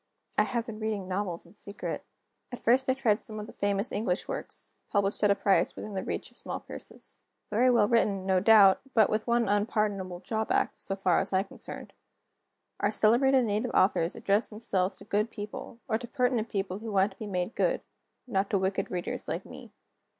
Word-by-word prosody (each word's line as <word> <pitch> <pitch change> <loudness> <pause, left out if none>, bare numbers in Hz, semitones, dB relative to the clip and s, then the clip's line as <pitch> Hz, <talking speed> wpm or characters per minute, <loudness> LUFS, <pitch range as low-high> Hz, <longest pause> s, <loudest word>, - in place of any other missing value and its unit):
I - - +4
have 235 -2 -2
been 220 -3 -7
reading 215 -3 -2
novels 185 -2 -3
in 170 - -18
secret. 205 -1 -5 0.5
At 245 - -5
first 260 +4 +2
I 260 - +3
tried 235 -6 +2
some 215 -2 -6
of 210 - -5
the - - -12
famous 200 +2 -1
English 205 -3 -1
works, - - -6 0.2
published 200 0 0
at 205 - +5
a 200 - +5
price 195 -3 +2
within 215 - -7
the 190 - -2
reach - - -4
of - - -15
small - - -4
purses. - - -8 0.3
Very 240 +5 +4
well 235 -4 +4
written, 205 -4 +2
no 190 -1 +3
doubt 200 -1 +7
but 220 -3 +5
with 215 +2 -1
one 235 -1 +2
unpardonable 205 -3 0
drawback, 220 +3 0
so 195 - -3
far 185 -3 +2
as 195 - -3
I 190 - +3
am - - -6
concerned. - - -8 0.9
Our 205 - +2
celebrated 245 +5 +4
native 210 0 0
authors 180 -3 +3
address 200 +3 +1
themselves 200 -4 -1
to - - -13
good 210 +2 0
people, 210 +2 -7
or 220 -1 +1
to 240 - -7
penitent 245 -2 0
people 195 -1 -2
who 225 0 -6
want 195 0 +3
to - - -19
be 215 - -5
made 180 +2 -2
good; - - +1 0.4
not 200 -5 0
to 205 - +2
wicked 190 +1 -1
readers 180 -1 -3
like - - -3
me. - - -11
210 Hz, 200 wpm, -29 LUFS, 195-225 Hz, 0.9 s, doubt